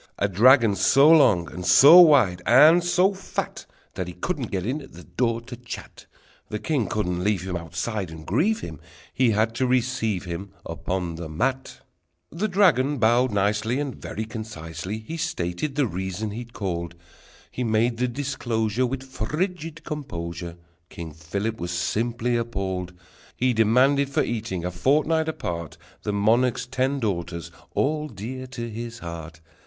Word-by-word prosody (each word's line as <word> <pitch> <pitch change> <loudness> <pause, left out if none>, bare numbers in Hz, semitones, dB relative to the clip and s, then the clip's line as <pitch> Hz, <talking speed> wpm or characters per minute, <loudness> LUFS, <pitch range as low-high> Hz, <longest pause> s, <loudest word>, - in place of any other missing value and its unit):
A 100 - +1
dragon 115 +2 +5
so 135 - +5
long, 105 - +5
and 90 +2 -6
so 145 - +9
wide, 125 - +5
and 155 +8 +7
so 180 +3 +3
fat, 195 - -5 0.3
That 90 - -4
he 90 - -7
couldn't 135 - -3
get 95 -2 -3
in 135 +6 -2
at 135 - -14
the 90 - -12
door 115 - -1
to 120 +1 -9
chat: 120 0 -10 0.4
The 105 - -3
king 130 -2 -1
couldn't 90 -3 -2
leave 100 -3 0
him 95 -1 -4
Outside 85 +4 -4
and 80 -1 -10
grieve 185 - +1
him, 80 -4 -7 0.3
He 130 -2 +3
had 110 +1 +1
to 130 +2 0
receive 125 -6 0
him 95 +3 -6
Upon 85 0 -3
the 85 -2 -6
mat, 130 +12 -2 0.5
The 190 +6 -1
dragon 165 -8 +3
bowed 120 +2 +3
nicely, 105 +5 0
And 140 -3 -3
very 110 - -5
concisely 100 -4 -6
He 110 +10 -7
stated 90 - -3
the 145 -2 +2
reason 95 +1 -4
he'd 115 +2 -8
called: 85 -3 -4 0.6
He 125 - -3
made 115 +1 +1
the 125 +1 +1
disclosure 120 -3 -1
With 130 +1 -4
frigid 160 - -4
composure. 85 - -6 0.3
King 85 -2 -8
Philip 100 +8 -4
was 85 - -4
simply 115 +7 -1
appalled! 95 -6 -3 0.4
He 130 0 +2
demanded 130 +6 +3
for 140 - +1
eating, 105 -7 -3
a 90 - -2
fortnight 155 - +1
apart, 85 - -5 0.2
The 105 - -2
monarch's 115 +4 +2
ten 130 +2 -1
daughters, 85 -6 -3 0.2
all 150 +1 0
dear 130 +3 -7
to 120 -2 -6
his 115 +1 -6
heart. 85 -3 -8
115 Hz, 160 wpm, -24 LUFS, 90-130 Hz, 0.6 s, so